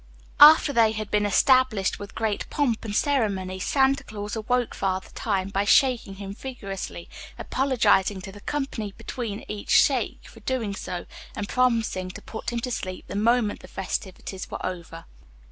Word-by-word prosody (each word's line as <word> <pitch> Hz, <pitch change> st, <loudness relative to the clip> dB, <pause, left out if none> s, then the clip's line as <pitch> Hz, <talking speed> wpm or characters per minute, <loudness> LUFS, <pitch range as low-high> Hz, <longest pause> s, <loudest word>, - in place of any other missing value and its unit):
After 295 Hz, 0 st, +9 dB
they 225 Hz, -3 st, +4 dB
had 215 Hz, -1 st, -5 dB
been 210 Hz, 0 st, +2 dB
established 235 Hz, -2 st, +3 dB
with 200 Hz, 0 st, -9 dB
great 220 Hz, -2 st, -2 dB
pomp 255 Hz, -7 st, 0 dB
and 210 Hz, -2 st, -4 dB
ceremony, 200 Hz, -10 st, 0 dB
Santa 270 Hz, +6 st, +2 dB
Claus 205 Hz, 0 st, -6 dB
awoke 245 Hz, +2 st, 0 dB
Father 190 Hz, -1 st, -2 dB
Time 195 Hz, -3 st, -1 dB
by 195 Hz, 0 st, 0 dB
shaking 235 Hz, -2 st, +3 dB
him 195 Hz, 0 st, -7 dB
vigorously, 200 Hz, -8 st, -7 dB, 0.3 s
apologizing 220 Hz, -7 st, +2 dB
to 195 Hz, -, -8 dB
the 205 Hz, +1 st, -13 dB
company 255 Hz, -8 st, -3 dB
between 225 Hz, -5 st, -5 dB
each 210 Hz, -1 st, -7 dB
shake -, -, +3 dB
for -, -, -14 dB
doing 235 Hz, -6 st, -2 dB
so, 180 Hz, -2 st, -5 dB, 0.3 s
and 205 Hz, -, -3 dB
promising 230 Hz, -7 st, +1 dB
to 185 Hz, -, -9 dB
put 220 Hz, -, -5 dB
him 235 Hz, -, -1 dB
to 250 Hz, -, -3 dB
sleep 185 Hz, -5 st, -5 dB
the -, -, -6 dB
moment 220 Hz, 0 st, +2 dB
the -, -, -13 dB
festivities 190 Hz, 0 st, -5 dB
were -, -, -5 dB
over. 170 Hz, -2 st, -6 dB
210 Hz, 160 wpm, -25 LUFS, 195-245 Hz, 0.3 s, After